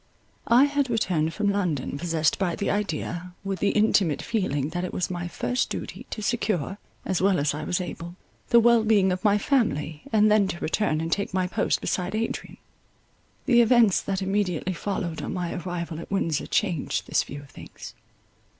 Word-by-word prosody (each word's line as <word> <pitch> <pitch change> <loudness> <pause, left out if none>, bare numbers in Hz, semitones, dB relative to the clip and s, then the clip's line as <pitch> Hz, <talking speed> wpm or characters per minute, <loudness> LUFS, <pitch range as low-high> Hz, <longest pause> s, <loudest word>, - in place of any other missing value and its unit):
I 240 +3 +6
had 285 -2 +1
returned 180 -9 0
from 205 +2 0
London 175 -10 -1
possessed 160 +1 0
by 180 -3 0
the 200 - -1
idea, 180 -2 -3
with 195 -2 -3
the 205 - +2
intimate 200 -7 +2
feeling 170 - -1
that 175 +2 -3
it 180 - -4
was 180 - -1
my 175 -1 -3
first 250 +7 -1
duty - - -6
to 215 - -5
secure, 205 - -1 0.3
as 185 - 0
well 195 -1 +3
as 145 0 +1
I 150 - -5
was 180 - -1
able, 175 -1 -6 0.3
the 235 - +7
well 235 -1 +5
being 205 -4 +3
of 185 +1 -3
my 205 -1 +4
family, 195 - 0
and 215 -1 +4
then 210 -2 +4
to 170 - -4
return 160 -3 0
and 165 0 -3
take 200 0 -1
my 185 -1 +2
post 180 - 0
beside 180 +2 -2
Adrian. 225 +1 -3 0.9
The 240 -3 +5
events 230 -4 +4
that 195 -1 -2
immediately 190 -2 -1
followed 180 -3 -3
on - - -4
my 175 -2 -2
arrival 170 -2 -4
at - - -9
Windsor 165 -6 -1
changed 180 -8 -1
this - - +2
view 145 +1 -7
of 140 - -17
things. - - -11
190 Hz, 185 wpm, -25 LUFS, 170-210 Hz, 0.9 s, the